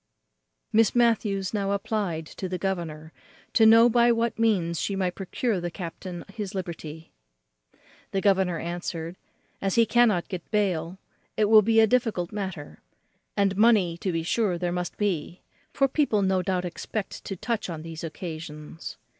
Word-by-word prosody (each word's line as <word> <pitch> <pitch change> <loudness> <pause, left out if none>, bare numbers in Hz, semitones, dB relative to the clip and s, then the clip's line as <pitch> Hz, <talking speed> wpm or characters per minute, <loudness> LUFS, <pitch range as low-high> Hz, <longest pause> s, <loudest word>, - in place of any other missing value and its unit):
Miss 220 0 +4
Matthews 215 -5 +2
now 200 -1 0
applied 200 -6 -2
to 185 +4 -6
the 185 - -2
governor 165 -5 -4 0.4
to 220 -2 +6
know 230 +1 +8
by 240 0 +4
what 230 0 0
means 180 -7 +1
she 200 - -1
might 185 -2 0
procure 195 +2 -2
the 175 - -2
captain 175 0 -7
his 205 -1 -5
liberty. 165 -3 -6 1.0
The 195 - -1
governor 190 -3 +2
answered, 170 0 -4 0.5
"As 195 -1 0
he 230 - +5
cannot 225 -7 +3
get 180 -3 -7
bail, 185 -5 0 0.4
it 215 - +4
will 215 +1 +7
be 225 +2 +3
a 220 - +7
difficult 220 -7 0
matter; 190 -8 -6 0.6
and 200 -1 +2
money 205 -5 +4
to 185 +2 -2
be 165 -1 -1
sure 190 0 +1
there 175 0 -2
must 180 0 -3
be; 180 -4 -2 0.3
for 275 - +2
people 265 -7 +1
no 190 -1 +2
doubt 180 0 -1
expect 195 +3 -5
to 195 - -4
touch 215 +1 -3
on 160 -2 -5
these 165 -1 -8
occasions. 160 -1 -7
190 Hz, 160 wpm, -26 LUFS, 170-215 Hz, 1.0 s, know